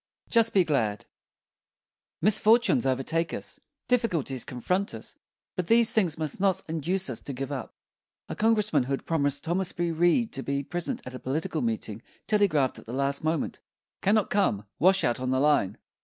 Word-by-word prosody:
JUST 230 Hz, -2 st, +4 dB
BE 190 Hz, -, +6 dB
GLAD 115 Hz, -10 st, -1 dB, 1.2 s
Misfortunes 210 Hz, -, +4 dB
overtake 155 Hz, +6 st, 0 dB
us, -, -, -6 dB, 0.3 s
difficulties 175 Hz, -, 0 dB
confront 180 Hz, -, -2 dB
us; -, -, -8 dB, 0.4 s
but 180 Hz, -3 st, -2 dB
these 230 Hz, 0 st, +5 dB
things 180 Hz, -8 st, +1 dB
must 155 Hz, 0 st, -4 dB
not 190 Hz, -2 st, +1 dB
induce 165 Hz, +4 st, -1 dB
us 130 Hz, -4 st, -4 dB
to 140 Hz, -, -6 dB
give 135 Hz, +2 st, -5 dB
up. 135 Hz, -4 st, -5 dB, 0.5 s
A -, -, -5 dB
Congressman 215 Hz, -, +2 dB
who 135 Hz, -, -2 dB
had 135 Hz, -, -3 dB
promised 145 Hz, -3 st, 0 dB
Thomas 175 Hz, +3 st, 0 dB
B. 170 Hz, -1 st, -1 dB
Reed 175 Hz, +8 st, +2 dB
to 135 Hz, -, -3 dB
be 140 Hz, +1 st, -2 dB
present 175 Hz, +4 st, -3 dB
at 130 Hz, -, -7 dB
a 130 Hz, -, -7 dB
political 155 Hz, +4 st, -2 dB
meeting 110 Hz, -2 st, -3 dB, 0.2 s
telegraphed 175 Hz, -11 st, +2 dB
at -, -, -15 dB
the 115 Hz, -, -6 dB
last 140 Hz, +2 st, -1 dB
moment: 160 Hz, -2 st, -1 dB, 0.4 s
"Cannot 210 Hz, 0 st, +2 dB
come; 150 Hz, -, +1 dB
washout 185 Hz, -10 st, +3 dB
on 130 Hz, 0 st, -2 dB
the 130 Hz, 0 st, +1 dB
line." 145 Hz, -9 st, +2 dB
160 Hz, 170 wpm, -27 LUFS, 135-195 Hz, 1.2 s, BE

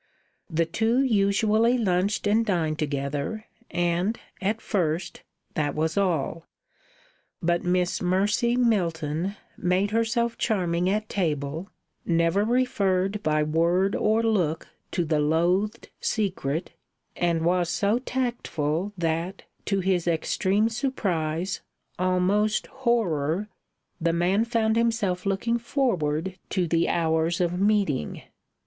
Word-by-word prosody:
The 165 Hz, 0 st, +1 dB
two 225 Hz, +9 st, +1 dB
usually 220 Hz, +1 st, +3 dB
lunched 200 Hz, -2 st, +1 dB
and 215 Hz, +3 st, +3 dB
dined 165 Hz, -7 st, 0 dB
together, 145 Hz, +8 st, -2 dB, 0.2 s
and 175 Hz, +6 st, 0 dB, 0.2 s
at 210 Hz, +3 st, 0 dB
first 175 Hz, -5 st, -2 dB, 0.3 s
that 145 Hz, -2 st, -1 dB
was 160 Hz, +1 st, 0 dB
all. 165 Hz, -4 st, 0 dB, 1.0 s
But 170 Hz, 0 st, +1 dB
Miss 180 Hz, 0 st, +1 dB
Mercy 205 Hz, +6 st, +2 dB
Milton 175 Hz, -6 st, 0 dB, 0.2 s
made 185 Hz, +3 st, +1 dB
herself 230 Hz, +1 st, 0 dB
charming 180 Hz, -5 st, +1 dB
at 215 Hz, +2 st, 0 dB
table, 160 Hz, -2 st, -2 dB, 0.3 s
never 170 Hz, +3 st, +2 dB
referred 205 Hz, -5 st, +1 dB
by 155 Hz, -3 st, +2 dB
word 170 Hz, +5 st, +2 dB
or 220 Hz, +2 st, +2 dB
look 180 Hz, -8 st, 0 dB, 0.2 s
to 175 Hz, -, 0 dB
the 155 Hz, -1 st, +1 dB
loathed 175 Hz, +9 st, +1 dB
secret, 180 Hz, -, -1 dB, 0.4 s
and 170 Hz, -2 st, 0 dB
was 175 Hz, -1 st, +2 dB
so 210 Hz, +6 st, +1 dB
tactful 205 Hz, -, -2 dB
that, 170 Hz, +3 st, -2 dB, 0.2 s
to 195 Hz, -1 st, 0 dB
his 180 Hz, -2 st, 0 dB
extreme 190 Hz, +5 st, +1 dB
surprise, 185 Hz, -, -2 dB, 0.4 s
almost 185 Hz, +4 st, +2 dB
horror, 210 Hz, -, 0 dB, 0.5 s
the 165 Hz, 0 st, +2 dB
man 185 Hz, +6 st, +2 dB
found 225 Hz, -1 st, +1 dB
himself 215 Hz, -6 st, 0 dB
looking 230 Hz, +5 st, 0 dB
forward 190 Hz, -, -1 dB
to 180 Hz, -3 st, 0 dB
the 165 Hz, +1 st, +1 dB
hours 165 Hz, 0 st, +1 dB
of 175 Hz, 0 st, 0 dB
meeting. 200 Hz, -, +1 dB
185 Hz, 115 wpm, -26 LUFS, 165-215 Hz, 1.0 s, usually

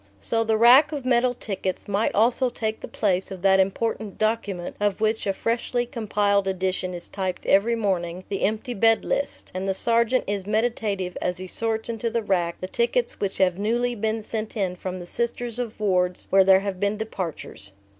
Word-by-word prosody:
So 225 Hz, -, 0 dB
the 220 Hz, -1 st, +1 dB
rack 255 Hz, +7 st, +7 dB
of 285 Hz, -4 st, -5 dB
metal 250 Hz, 0 st, +2 dB
tickets 190 Hz, -4 st, -4 dB
might 205 Hz, +2 st, 0 dB
almost 240 Hz, +3 st, +2 dB
take 220 Hz, -1 st, -2 dB
the -, -, -7 dB
place 190 Hz, -3 st, 0 dB
of 190 Hz, -2 st, -8 dB
that 195 Hz, 0 st, +5 dB
important 205 Hz, +2 st, -1 dB
document, 210 Hz, -5 st, -1 dB
of 205 Hz, -1 st, 0 dB
which 220 Hz, 0 st, 0 dB
a -, -, +3 dB
freshly 235 Hz, +4 st, -1 dB
compiled 205 Hz, -4 st, 0 dB
edition 185 Hz, -1 st, -2 dB
is 175 Hz, -, -7 dB
typed 190 Hz, -2 st, -4 dB
every 215 Hz, +5 st, +3 dB
morning, 185 Hz, -5 st, -2 dB
the 195 Hz, -, -3 dB
Empty 220 Hz, +5 st, -1 dB
Bed 225 Hz, +1 st, +3 dB
List; 280 Hz, -, -2 dB
and 185 Hz, +1 st, -3 dB
the 190 Hz, -, 0 dB
sergeant 235 Hz, +4 st, +3 dB
is 200 Hz, -1 st, -3 dB
meditative 210 Hz, -4 st, -1 dB
as 180 Hz, 0 st, -1 dB
he 185 Hz, -, -7 dB
sorts 220 Hz, +3 st, -2 dB
into 230 Hz, 0 st, -2 dB
the 230 Hz, 0 st, -1 dB
rack 175 Hz, -4 st, 0 dB
the 185 Hz, -, -3 dB
tickets 235 Hz, +3 st, 0 dB
which 200 Hz, -2 st, -2 dB
have 185 Hz, -1 st, +2 dB
newly 240 Hz, +4 st, 0 dB
been 220 Hz, 0 st, -2 dB
sent 220 Hz, +1 st, -5 dB
in 185 Hz, -3 st, -1 dB
from 185 Hz, 0 st, -5 dB
the 175 Hz, -, -8 dB
Sisters 235 Hz, +4 st, -3 dB
of 235 Hz, -3 st, -4 dB
wards 180 Hz, -3 st, 0 dB
where 195 Hz, 0 st, +6 dB
there 190 Hz, 0 st, +6 dB
have 195 Hz, -2 st, -4 dB
been 200 Hz, +1 st, 0 dB
departures. 180 Hz, -, -6 dB
210 Hz, 195 wpm, -24 LUFS, 190-230 Hz, -, rack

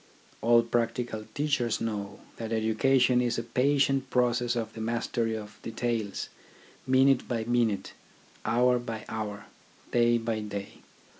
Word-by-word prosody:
All 115 Hz, 0 st, +5 dB
practical 115 Hz, -1 st, -1 dB
teachers 145 Hz, -6 st, 0 dB
know 105 Hz, -3 st, -4 dB, 0.2 s
that 115 Hz, -1 st, -5 dB
education 125 Hz, +3 st, +3 dB
is 120 Hz, -1 st, 0 dB
a 115 Hz, -, -2 dB
patient 135 Hz, +2 st, +2 dB
process 120 Hz, -1 st, +1 dB
of 115 Hz, -2 st, -3 dB
the 110 Hz, -, -7 dB
mastery 115 Hz, 0 st, -1 dB
of 105 Hz, -1 st, -8 dB
details, 115 Hz, -3 st, -2 dB, 0.6 s
minute 130 Hz, 0 st, +4 dB
by 115 Hz, -3 st, -1 dB
minute, 115 Hz, -3 st, 0 dB, 0.5 s
hour 125 Hz, +1 st, +3 dB
by 115 Hz, -2 st, -6 dB
hour, 105 Hz, -2 st, -5 dB, 0.5 s
day 120 Hz, 0 st, +4 dB
by 115 Hz, -1 st, -2 dB
day. 100 Hz, -2 st, -6 dB
115 Hz, 130 wpm, -28 LUFS, 110-125 Hz, 0.6 s, All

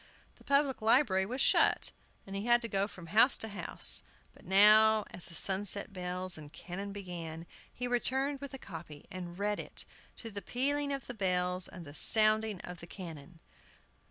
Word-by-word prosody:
The -, -, -20 dB
public 280 Hz, -2 st, +1 dB
library 215 Hz, -5 st, +3 dB
was 255 Hz, +4 st, -3 dB
shut, -, -, +3 dB, 0.3 s
and 195 Hz, -, -8 dB
he 200 Hz, +4 st, -4 dB
had 240 Hz, 0 st, +5 dB
to -, -, -2 dB
go 195 Hz, -2 st, -1 dB
from 180 Hz, -5 st, -12 dB
house 220 Hz, +9 st, +5 dB
to 220 Hz, -, -4 dB
house; 190 Hz, -5 st, +2 dB, 0.3 s
but -, -, -20 dB
now, 215 Hz, +3 st, +6 dB
as 175 Hz, 0 st, +1 dB
the 170 Hz, -, -8 dB
sunset 195 Hz, +3 st, +2 dB
bells 180 Hz, -1 st, -3 dB
and 150 Hz, -1 st, -12 dB
cannon 180 Hz, +6 st, -7 dB
began, 170 Hz, -4 st, -7 dB, 0.3 s
he 245 Hz, -, -5 dB
returned 265 Hz, +3 st, -1 dB
with 280 Hz, -1 st, -7 dB
a -, -, -7 dB
copy, 165 Hz, -, -10 dB
and 180 Hz, -1 st, -7 dB
read 205 Hz, +1 st, -1 dB
it, -, -, -5 dB, 0.3 s
to 225 Hz, -, -8 dB
the 200 Hz, 0 st, -6 dB
pealing 280 Hz, +7 st, 0 dB
of 275 Hz, -1 st, -4 dB
the 245 Hz, -, -6 dB
bells 180 Hz, -3 st, 0 dB
and 175 Hz, -2 st, -10 dB
sounding 215 Hz, -1 st, +3 dB
of 180 Hz, 0 st, -8 dB
the 170 Hz, -, -10 dB
cannon. 165 Hz, -3 st, -10 dB
200 Hz, 180 wpm, -31 LUFS, 180-230 Hz, 0.3 s, now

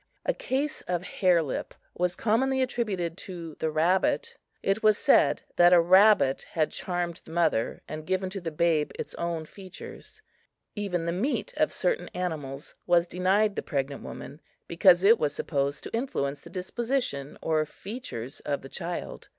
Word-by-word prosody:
A -, -, +2 dB
case 290 Hz, -, -2 dB
of 180 Hz, -1 st, -1 dB
hare 180 Hz, -2 st, +2 dB
lip 140 Hz, -, -4 dB, 0.2 s
was 180 Hz, 0 st, 0 dB
commonly 260 Hz, +5 st, +1 dB
attributed 200 Hz, -9 st, -2 dB
to 170 Hz, -4 st, -7 dB
the 160 Hz, -, 0 dB
rabbit. 185 Hz, -, +1 dB, 0.3 s
It 195 Hz, +3 st, +1 dB
was 215 Hz, -1 st, +5 dB
said -, -, +4 dB
that 175 Hz, +1 st, +7 dB
a 175 Hz, -, +8 dB
rabbit 185 Hz, -4 st, +5 dB
had 155 Hz, -2 st, +1 dB
charmed 175 Hz, -2 st, -3 dB
the -, -, -18 dB
mother 165 Hz, -9 st, 0 dB
and 155 Hz, 0 st, -7 dB
given 185 Hz, 0 st, -1 dB
to 195 Hz, -1 st, -5 dB
the 170 Hz, -, -3 dB
babe 155 Hz, -1 st, +1 dB
its -, -, -6 dB
own 170 Hz, -2 st, -3 dB
features. 190 Hz, +3 st, -11 dB, 0.5 s
Even 190 Hz, -5 st, -2 dB
the 170 Hz, -, 0 dB
meat 265 Hz, -, -1 dB
of -, -, +2 dB
certain -, -, -1 dB
animals 155 Hz, -6 st, -4 dB
was 175 Hz, -1 st, +4 dB
denied 195 Hz, +4 st, +1 dB
the -, -, -1 dB
pregnant 140 Hz, -2 st, -3 dB
woman, 145 Hz, +4 st, -9 dB, 0.3 s
because 175 Hz, +1 st, +5 dB
it 220 Hz, +3 st, +6 dB
was 150 Hz, -2 st, 0 dB
supposed 140 Hz, -1 st, -1 dB
to -, -, -8 dB
influence 145 Hz, -, -2 dB
the -, -, -12 dB
disposition 190 Hz, -, -2 dB
or 155 Hz, -1 st, +1 dB
features 190 Hz, -, -7 dB
of 140 Hz, -2 st, -3 dB
the 135 Hz, -, -9 dB
child. 175 Hz, +2 st, -5 dB
175 Hz, 165 wpm, -27 LUFS, 155-205 Hz, 0.5 s, a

